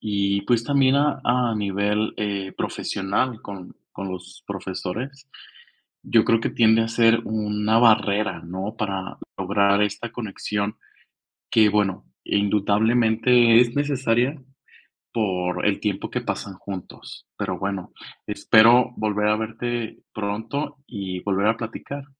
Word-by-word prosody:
y, 100 -1 0
pues, 115 +1 +1
también 140 -1 +3
a 145 -1 +1
a 120 -1 +2
nivel, 105 +1 -1
eh, 100 -2 -3
profesional 110 +5 -2
con 95 -3 -9 0.2
con 95 +1 -6
los 95 0 -9
profesores, 100 +8 -6 0.7
yo 115 -2 +3
creo 115 -1 +3
que - - -1
tiende 115 -1 +4
a 115 - -2
ser 115 0 +4
una 105 0 0
barrera, 110 -2 +3
¿no?, 95 +5 -5
para 95 -3 -4 0.2
lograr 100 +1 +2
esta 105 +3 -2
conexión 105 -2 -3 0.7
que, 110 -2 +5
bueno, 100 -2 0 0.2
indudablemente 110 +3 +3
es 120 -1 +2
necesaria 135 -1 +1 0.7
por 90 -5 -1
el - - +1
tiempo - - -2
que - - -3
pasan 100 - -4
juntos, 95 -1 -9
pero, - - -3
bueno, 95 -1 -4 0.4
espero 120 +3 +5
volver 105 -1 0
a 105 - +3
verte 115 +1 -4
pronto 110 +8 -4
y 95 -5 -5
volver 100 +1 0
a 115 +1 +2
platicar. 135 +5 -7
110 Hz, 125 wpm, -23 LUFS, 100-120 Hz, 0.7 s, que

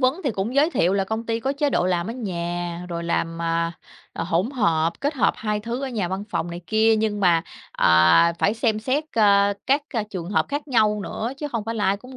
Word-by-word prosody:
vấn 260 +7 +2
thì 270 - +1
cũng 210 +3 -3
giới 295 +4 +4
thiệu 180 - +2
là 195 -1 +1
công 220 +3 -4
ty 230 0 -1
có 270 +3 -1
chế 285 0 0
độ 180 - +1
làm 175 -1 0
ở 225 - -4
nhà, 175 -5 -4
rồi 170 -1 -4
làm, 165 0 -2
à, 165 0 0 0.4
à, - - -4
hỗn 180 +7 0
hợp, 170 - +1
kết 290 +2 -1
hợp 255 - +2
hai 210 -1 -2
thứ 235 +5 -4
ở 270 - -2
nhà, 215 -8 -2
văn 190 +2 -4
phòng 175 - -2
này 170 +1 -6
kia, 220 0 +3
nhưng 215 -1 -1
mà, 170 -4 +4 0.3
à, 85 - +5
phải 205 - +2
xem 225 -2 0
xét, 270 +7 -1
ơ, 200 -2 +4
các 280 +3 +3
c 215 -2 -2
trường 180 -2 -5
hợp - - +1
khác 290 +1 -4
nhau 215 -4 +2
nữa, 230 +5 -4
chứ 295 - -4
không 230 -6 -3
phải 225 +1 -3
là 210 - -1
ai 195 +1 +2
cũng 255 +5 -13
210 Hz, 245 wpm, -23 LUFS, 175-240 Hz, 0.4 s, à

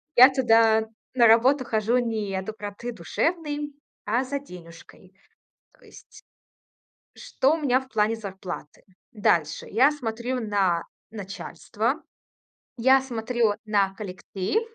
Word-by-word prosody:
Я 255 +2 +10
туда, 225 -4 +4 0.3
на 240 -2 +5
работу, 255 +5 +5
хожу 225 +1 +1
не 220 -5 -2
от 190 - -4
доброты 215 +2 -6
душевной, 295 - -2 0.3
а 235 +5 +1
за 280 +2 -3
денюжкой 180 -4 -14 0.6
то - - -26
есть. - - -16 0.9
Что 270 +3 0
у - - -3
меня 265 -5 +2
в 265 - -15
плане 220 -1 +1
зарплаты? 190 -7 -8 0.3
Дальше: 165 -8 0
я 260 +8 +4
смотрю 245 -2 -3
на 195 -6 +1 0.3
начальство, 200 -3 -4 0.8
я 265 +3 +5
смотрю 235 -3 0
на 200 -2 +1
коллектив 195 - -3
225 Hz, 120 wpm, -25 LUFS, 200-255 Hz, 0.9 s, Я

